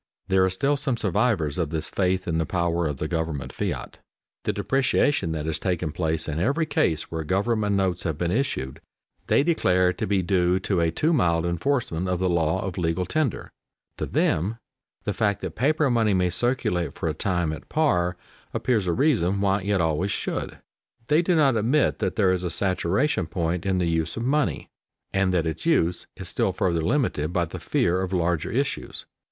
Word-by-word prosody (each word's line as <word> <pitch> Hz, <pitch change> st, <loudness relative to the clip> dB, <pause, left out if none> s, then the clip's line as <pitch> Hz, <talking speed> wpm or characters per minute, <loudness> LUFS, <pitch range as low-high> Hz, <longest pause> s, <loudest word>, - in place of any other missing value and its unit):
There 95 Hz, 0 st, +4 dB
are 95 Hz, -, +3 dB
still 140 Hz, +10 st, 0 dB
some 135 Hz, -3 st, -1 dB
survivors 100 Hz, -, 0 dB
of 80 Hz, -4 st, 0 dB
this 80 Hz, 0 st, -1 dB
faith 95 Hz, 0 st, 0 dB
in 80 Hz, -1 st, 0 dB
the 80 Hz, -, +1 dB
power 85 Hz, -2 st, 0 dB
of 75 Hz, -2 st, -3 dB
the 80 Hz, -, -2 dB
government 80 Hz, -4 st, -3 dB
fiat. -, -, -4 dB, 0.5 s
The -, -, +2 dB
depreciation 135 Hz, -, +1 dB
that 75 Hz, -1 st, -3 dB
has 80 Hz, -1 st, -2 dB
taken 90 Hz, -4 st, -1 dB
place 80 Hz, 0 st, -1 dB
in 75 Hz, 0 st, -2 dB
every 140 Hz, -, +1 dB
case 80 Hz, -, 0 dB
where 80 Hz, -1 st, -3 dB
government 105 Hz, +4 st, +1 dB
notes 95 Hz, -3 st, 0 dB
have 80 Hz, -3 st, -2 dB
been 85 Hz, +1 st, -1 dB
issued, 105 Hz, -, -2 dB, 0.5 s
they -, -, +4 dB
declare 90 Hz, -, +2 dB
to -, -, -3 dB
be 95 Hz, -1 st, +1 dB
due 90 Hz, 0 st, +2 dB
to 95 Hz, -1 st, 0 dB
a 85 Hz, -, +2 dB
too 155 Hz, -, +1 dB
mild 85 Hz, -, +2 dB
enforcement 90 Hz, -, -1 dB
of 90 Hz, -, +1 dB
the 90 Hz, 0 st, 0 dB
law 80 Hz, -2 st, +1 dB
of 95 Hz, -2 st, -4 dB
legal 85 Hz, +1 st, 0 dB
tender. 150 Hz, -, -1 dB, 0.5 s
To -, -, -3 dB
them 100 Hz, +9 st, 0 dB, 0.5 s
the 105 Hz, -, -1 dB
fact 105 Hz, -2 st, 0 dB
that 95 Hz, -4 st, -4 dB
paper 150 Hz, +4 st, +2 dB
money 110 Hz, -4 st, +2 dB
may 90 Hz, -1 st, +2 dB
circulate 90 Hz, -, 0 dB
for -, -, -3 dB
a 80 Hz, -, 0 dB
time 90 Hz, -1 st, -1 dB
at 80 Hz, -, -10 dB
par 90 Hz, -, +1 dB, 0.4 s
appears 110 Hz, -7 st, +1 dB
a 85 Hz, -, +2 dB
reason 100 Hz, -, +2 dB
why 100 Hz, 0 st, +2 dB
it 100 Hz, 0 st, 0 dB
always 80 Hz, +3 st, +1 dB
should. -, -, -3 dB, 0.5 s
They 150 Hz, +3 st, +5 dB
do 175 Hz, 0 st, +1 dB
not 140 Hz, -6 st, +4 dB
admit 120 Hz, +7 st, +2 dB
that -, -, -1 dB
there 95 Hz, -4 st, +3 dB
is 90 Hz, -1 st, -2 dB
a 90 Hz, -, -1 dB
saturation 95 Hz, -, 0 dB
point 85 Hz, +2 st, -2 dB
in 95 Hz, -1 st, +1 dB
the 90 Hz, -, +1 dB
use 80 Hz, -1 st, -1 dB
of 115 Hz, -, -2 dB
money, 145 Hz, +4 st, 0 dB, 0.5 s
and 95 Hz, -1 st, +2 dB
that 85 Hz, -3 st, +1 dB
its 80 Hz, -, -3 dB
use 90 Hz, -, +1 dB
is -, -, -5 dB
still -, -, 0 dB
further 85 Hz, -3 st, 0 dB
limited 85 Hz, -, 0 dB
by 90 Hz, -1 st, +1 dB
the -, -, -8 dB
fear 90 Hz, +2 st, +1 dB
of 95 Hz, -1 st, -3 dB
larger 85 Hz, -3 st, 0 dB
issues. 135 Hz, +4 st, -3 dB
90 Hz, 195 wpm, -25 LUFS, 85-115 Hz, 0.5 s, They